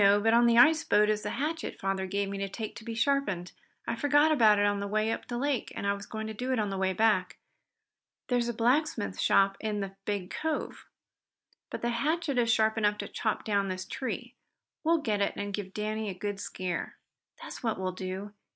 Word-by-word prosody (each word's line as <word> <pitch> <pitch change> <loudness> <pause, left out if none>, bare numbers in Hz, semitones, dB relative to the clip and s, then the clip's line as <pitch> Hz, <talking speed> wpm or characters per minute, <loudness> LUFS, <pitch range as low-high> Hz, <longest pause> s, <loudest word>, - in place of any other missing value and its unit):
But 205 +3 +5
on 235 +1 +6
the 235 0 +4
ice 315 +6 +6
boat 210 +1 +3
is 210 0 -1
that 210 - -3
hatchet 300 +8 -3
father 195 0 -1
gave 200 +1 -1
me 200 0 -4
to 195 0 -2
take 215 +2 -6
to - - -10
be 230 0 -5
sharpened. 225 -8 0 0.4
I 235 - -1
forgot 290 +5 +4
about 220 -8 +5
it 205 - +3
on 205 0 +1
the 200 - -3
way 215 +2 +1
up - - -4
the 240 - -3
lake, 275 0 -1
and - - -4
I 200 - +2
was 200 0 -8
going 220 0 -5
to 220 - -5
do 250 +4 -3
it 255 - +1
on 210 -2 0
the 195 - -3
way 190 0 +2
back. 190 -2 +2 0.9
There's 245 -1 +1
a - - +1
blacksmith 240 - +1
shop 195 0 +3
in 215 -1 -2
the 195 -1 -5
big 200 -3 -3
cove. 320 -1 -3 0.8
But - - -6
the 240 - +1
hatchet 285 +3 0
is 230 -1 +3
sharp 220 0 +2
enough 210 -1 +2
to - - -5
chop 220 - -2
down 200 -2 +1
this 185 0 -4
tree. 245 -1 -5 0.5
We'll 330 +1 +4
get 210 -3 0
it 200 - +1
and 205 0 -4
give 195 -2 -4
Danny 215 +1 -3
a 190 - -5
good 205 +1 -4
scare." 185 -3 -4 0.4
"That's - - -8
what 225 -3 -1
we - - -4 0.2
will. 195 +2 -5
215 Hz, 225 wpm, -29 LUFS, 200-240 Hz, 0.9 s, on